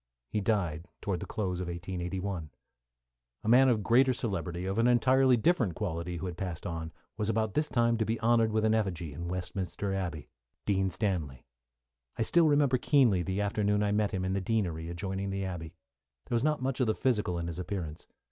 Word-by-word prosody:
He 105 - 0
died 90 -6 0
towards 100 -4 -2
the - - -6
close 95 -5 -2
of 90 - -3
1881. 90 0 -4 0.9
A - - -6
man 130 +3 +6
of 110 -4 +1
greater 130 +4 +4
celebrity, 90 -6 -3
of 95 +3 -1
an 115 - +4
entirely 130 +1 +4
different 120 - +2
quality, 85 -3 -3
who 80 - -5
had 90 -2 -5
passed 90 -2 -4
on, 80 -2 -4 0.3
was 105 0 -1
about 110 -2 0
this 150 0 0
time 115 -1 +2
to 110 - +1
be 115 +1 -1
honoured 115 -1 +3
with 110 0 +1
an 110 - +3
effigy 90 -8 -1
in 85 +4 -5
Westminster 90 +2 -3
Abbey 90 -6 -3 0.4
Dean 95 -1 +1
Stanley. 85 - -2 0.7
I 115 - +1
still 165 +7 +4
remember 145 -4 +3
keenly 120 -12 +4
the 95 +3 -1
afternoon 105 0 +1
I 105 - +1
met 105 0 +2
him 95 -1 -2
in 95 - 0
the 100 - 0
Deanery 90 -6 -1
adjoining 95 +3 -3
the 95 0 -2
abbey. 85 -2 -6 0.5
There - - -2
was 115 - +1
not 150 -3 +1
much 135 0 -1
of 125 - +2
the 110 - +1
physical 105 -9 0
in 85 - -3
his 85 +1 -5
appearance. 90 -5 -5
100 Hz, 200 wpm, -30 LUFS, 90-115 Hz, 0.9 s, man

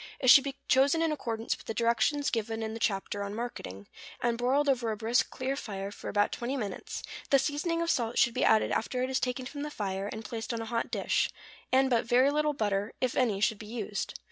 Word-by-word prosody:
It 255 -2 +6
should 275 +2 +8
be 275 -1 -3
chosen 280 +5 +4
in 325 - +1
accordance 230 -6 -2
with - - -16
the 225 - -3
directions 240 +5 +2
given 225 -1 -2
in 220 0 -3
the 225 - -6
chapter 205 -2 -1
on 200 +1 -4
marketing, 100 - -6 0.3
and 240 -1 +1
broiled 260 +5 +1
over 245 -4 +1
a 215 - -3
brisk, 230 +3 +1
clear 260 +1 -2
fire 200 -6 -5
for - - -7
about 205 0 +2
twenty 250 +3 -3
minutes; 210 -6 -5 0.3
the 275 - +6
seasoning 310 +5 0
of 335 - +1
salt 235 -1 -1
should 235 - +4
be - - 0
added 220 - +4
after 250 +3 -1
it 260 - -2
is 265 - +1
taken 250 0 -2
from 285 +3 -6
the 300 - -3
fire, 195 -6 -3
and 220 0 -7
placed 230 +1 -4
on - - -3
a 225 - -4
hot 230 +1 -2
dish; - - +1 0.4
and 265 0 +4
but 235 -1 +3
very 255 +4 +4
little 300 0 +1
butter, 205 -4 -1
if 255 -1 0
any, 225 -7 +2
should 215 0 +1
be 215 - -9
used. 215 -2 -4
235 Hz, 235 wpm, -30 LUFS, 220-265 Hz, 0.4 s, should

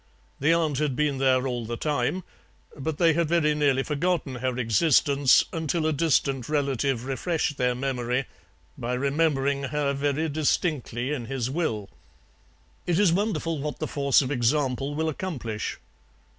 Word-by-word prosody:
The 150 +4 +3
aunt 160 -5 +1
had 150 -4 0
been 145 -2 0
there 130 -1 +3
all 125 -2 -2
the 115 +1 -4
time, 150 +6 -1 0.5
but 150 +1 -4
they 165 -2 +4
had 170 0 +1
very 160 -3 +3
nearly 140 -3 +2
forgotten 150 -1 -1
her 130 0 -2
existence 140 +3 +4
until 160 0 -1
a 155 - +2
distant 140 -4 +1
relative 135 -4 0
refreshed 145 +2 -1
their 125 -1 +1
memory 125 0 -1 0.5
by 125 +1 -2
remembering 140 0 +1
her 145 0 -1
very 145 +3 0
distinctly 145 -4 -1
in 125 -5 -4
his 130 -2 -2
will; 125 - -2 1.0
it 175 -2 +2
is 195 -4 +4
wonderful 170 -5 -1
what 150 +1 -4
the - - -3
force 140 -1 +3
of 130 - -4
example 135 +2 0
will 160 +1 -1
accomplish. 135 - -4
140 Hz, 150 wpm, -26 LUFS, 130-155 Hz, 1.0 s, they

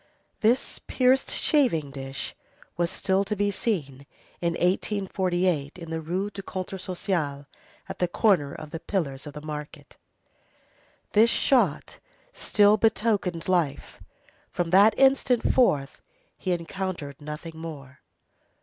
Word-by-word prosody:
This 235 +4 +1
pierced 260 +1 +3
shaving 200 - +2
dish 135 0 -5 0.4
was 170 0 0
still 190 +2 +1
to 210 +2 -3
be 205 0 +1
seen 140 - -3 0.3
in 170 -1 +1
1848, 180 -4 0
in 165 -2 -9
the 160 0 -2
Rue 185 +6 -2
du 200 - -7
Contrat 190 0 -6
Social, 170 -7 -2 0.4
at - - -7
the 180 - +2
corner 175 -6 +2
of 150 +1 -9
the 165 - -5
pillars 150 -8 -3
of 145 - -8
the 150 +1 -9
market. 150 -1 -8 1.1
This 220 +2 +5
shot 225 - +1 0.3
still 205 0 +4
betokened 210 -6 +1
life. 175 -7 -1 0.5
From 175 -2 -2
that 200 +4 +6
instant 265 -3 +3
forth 145 - +2 0.3
he 185 - -3
encountered 170 -4 -4
nothing 155 +2 -7
more. 140 -5 -9
180 Hz, 125 wpm, -26 LUFS, 150-205 Hz, 1.1 s, that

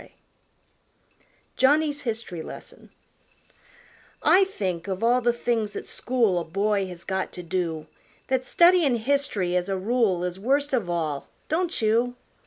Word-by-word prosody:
_ - - -16 1.5
Johnny's 290 +2 +3
Hist'ry 220 -7 -3
Lesson - - -10 1.3
I 385 +2 +6
think, 185 - -4
of 190 +2 -3
all 245 +2 +4
the 240 0 +3
things 230 -3 -1
at - - -5
school 230 -8 0
A - - -3
boy 195 +3 0
has 175 -2 -9
got 190 0 -2
to 180 - -7
do, 165 -3 -2 0.4
That 260 -1 0
studyin' 340 -3 +4
hist'ry, 225 -8 0
as 180 +1 0
a 195 - 0
rule, 200 -3 +1
Is 180 +1 -3
worst 275 +6 +1
of 225 -9 0
all, 155 -5 -2 0.2
don't 340 -5 0
you? 235 +3 +2
220 Hz, 145 wpm, -25 LUFS, 180-255 Hz, 1.5 s, I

